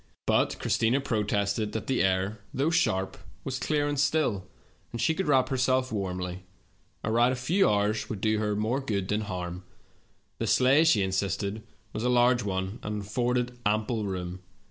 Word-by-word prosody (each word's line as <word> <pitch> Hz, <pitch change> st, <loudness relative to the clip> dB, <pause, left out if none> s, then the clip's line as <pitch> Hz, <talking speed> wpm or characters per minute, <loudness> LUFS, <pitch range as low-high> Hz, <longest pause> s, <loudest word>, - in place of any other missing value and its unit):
But -, -, +2 dB
Christina 120 Hz, +4 st, +1 dB
protested 105 Hz, -3 st, -1 dB
that 110 Hz, -3 st, -3 dB
the 130 Hz, -, +1 dB
air, 95 Hz, +2 st, 0 dB
though 140 Hz, +5 st, +1 dB
sharp, 95 Hz, -, +1 dB, 0.3 s
was 130 Hz, -2 st, -3 dB
clear 145 Hz, -1 st, 0 dB
and 145 Hz, -1 st, -1 dB
still, 145 Hz, -10 st, +1 dB, 0.4 s
and 115 Hz, -, -5 dB
she 160 Hz, -, +2 dB
could 190 Hz, +1 st, -2 dB
wrap 135 Hz, -3 st, +3 dB
herself 130 Hz, -1 st, +1 dB
warmly; 90 Hz, -3 st, -3 dB, 0.6 s
a 110 Hz, -, -1 dB
ride 120 Hz, +2 st, +4 dB
of 130 Hz, -, -2 dB
a -, -, -8 dB
few 180 Hz, +9 st, +3 dB
hours 105 Hz, +1 st, 0 dB
would 105 Hz, -, -4 dB
do 110 Hz, +1 st, +1 dB
her 105 Hz, -1 st, 0 dB
more 110 Hz, +6 st, 0 dB
good 105 Hz, -8 st, -2 dB
than 105 Hz, +1 st, +1 dB
harm. 90 Hz, -3 st, -5 dB, 0.8 s
The 115 Hz, -, -1 dB
sleigh, 135 Hz, +8 st, +5 dB
she 110 Hz, -11 st, +4 dB
insisted, 100 Hz, +2 st, -1 dB, 0.3 s
was 110 Hz, -, -3 dB
a 125 Hz, -, +2 dB
large 125 Hz, 0 st, +4 dB
one, 95 Hz, +1 st, -3 dB
and 105 Hz, 0 st, -4 dB
afforded 125 Hz, +3 st, -1 dB
ample 110 Hz, +1 st, 0 dB
room. 90 Hz, -1 st, -4 dB
110 Hz, 175 wpm, -28 LUFS, 100-130 Hz, 0.8 s, sleigh